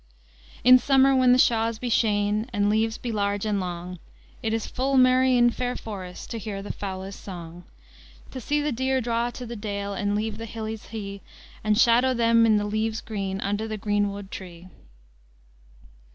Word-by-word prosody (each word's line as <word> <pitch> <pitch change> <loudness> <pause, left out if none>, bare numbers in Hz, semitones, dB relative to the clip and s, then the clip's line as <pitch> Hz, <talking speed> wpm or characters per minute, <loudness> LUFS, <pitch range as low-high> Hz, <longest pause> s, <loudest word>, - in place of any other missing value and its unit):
"In 255 +1 +8
somer, 270 +1 +4
when 255 -1 +5
the 250 - +6
shawes 230 -2 +2
be 250 - -5
sheyne, 210 0 +1
And 205 -2 +1
leves 220 +1 +1
be 240 - -5
large 205 -1 -1
and 210 -2 0
longe, 180 -1 -5 0.4
Hit 220 - -1
is 225 -1 -1
full 270 +1 -1
merry 255 0 +5
in 240 0 +5
feyre 250 +1 -3
forést 185 -5 -8
To 230 - -4
here 200 -2 -5
the 205 - -5
foulys 190 0 -6
song. 175 -2 -9 0.7
"To 260 - -7
se 295 +5 0
the 295 0 -1
dere 260 +2 0
draw 235 0 -1
to 245 +1 -8
the 235 0 -7
dale, 200 -2 -4
And 205 +1 -1
leve 215 +1 -2
the 230 - -6
hilles 220 -1 -6
hee, 200 -3 -7 0.4
And 215 -1 +2
shadow 245 +2 +4
them 230 -1 +4
in 215 -1 +4
the 205 - -1
leves 215 +1 -1
grene, 195 -3 -4
Under 205 +2 -2
the 215 -1 -4
grene 205 0 0
wode 200 -1 -8
tree." 180 -1 -9
220 Hz, 185 wpm, -25 LUFS, 200-240 Hz, 0.7 s, In